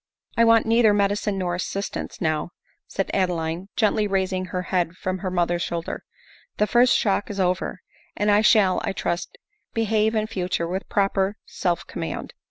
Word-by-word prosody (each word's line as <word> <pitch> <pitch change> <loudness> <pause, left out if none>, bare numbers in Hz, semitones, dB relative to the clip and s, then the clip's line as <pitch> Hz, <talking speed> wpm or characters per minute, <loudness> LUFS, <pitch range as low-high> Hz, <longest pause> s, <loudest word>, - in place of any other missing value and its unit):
" - - -33
I 230 - +7
want 230 -1 +5
neither 225 -2 +4
medicine 205 0 +1
nor 180 -2 -1
assistance 195 +3 -4
now," 155 -1 0 0.4
said 195 - -2
Adeline, 175 -1 -1
gently 215 -1 +2
raising 190 -1 0
her 180 0 -3
head 175 -2 +1
from 185 0 -3
her 190 - -3
mother's 175 -1 0
shoulder; 170 0 -3 0.3
" - - -28
the 210 - +3
first 245 +4 +4
shock 205 -1 0
is 200 -1 -5
over, 185 0 0 0.4
and 205 +1 +2
I 205 +1 +5
shall, 210 -4 +4
I - - -1
trust, 175 -2 -3 0.4
be 225 - +2
have 220 0 +2
in 215 -1 +1
future 180 -5 -2
with 185 +3 -4
proper 195 0 +1
self 175 -3 -2
command." - - -5
195 Hz, 180 wpm, -24 LUFS, 180-210 Hz, 0.4 s, I